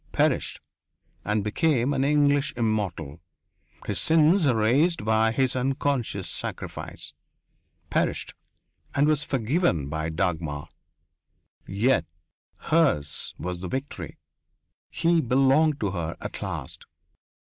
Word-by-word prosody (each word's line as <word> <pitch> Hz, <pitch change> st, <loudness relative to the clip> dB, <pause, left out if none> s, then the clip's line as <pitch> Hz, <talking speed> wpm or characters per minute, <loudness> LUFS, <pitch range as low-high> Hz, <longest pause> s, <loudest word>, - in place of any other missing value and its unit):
Perished, -, -, +1 dB, 0.6 s
and 105 Hz, 0 st, 0 dB
became 130 Hz, +4 st, +1 dB
an 135 Hz, -1 st, +1 dB
English 145 Hz, 0 st, +2 dB
immortal 100 Hz, -, -2 dB, 0.6 s
his -, -, -2 dB
sins 160 Hz, +2 st, +4 dB
erased 125 Hz, +5 st, +2 dB
by 110 Hz, 0 st, +3 dB
his 130 Hz, +2 st, +1 dB
unconscious 130 Hz, -6 st, -1 dB
sacrifice. -, -, -6 dB, 0.8 s
Perished, -, -, 0 dB, 0.6 s
and 140 Hz, +1 st, +4 dB
was 150 Hz, -1 st, +2 dB
forgiven 125 Hz, -, 0 dB
by 80 Hz, +1 st, -2 dB
Dagmar. 80 Hz, -3 st, -2 dB, 1.0 s
Yet 105 Hz, 0 st, +2 dB, 0.7 s
hers 140 Hz, -, +1 dB
was 90 Hz, 0 st, -5 dB
the 95 Hz, -, -4 dB
victory 135 Hz, +6 st, -5 dB, 0.7 s
he 165 Hz, 0 st, +2 dB
belonged 135 Hz, +4 st, +3 dB
to 100 Hz, -3 st, 0 dB
her 85 Hz, -3 st, -4 dB
at -, -, -7 dB
last. -, -, -6 dB
125 Hz, 105 wpm, -26 LUFS, 95-145 Hz, 1.0 s, sins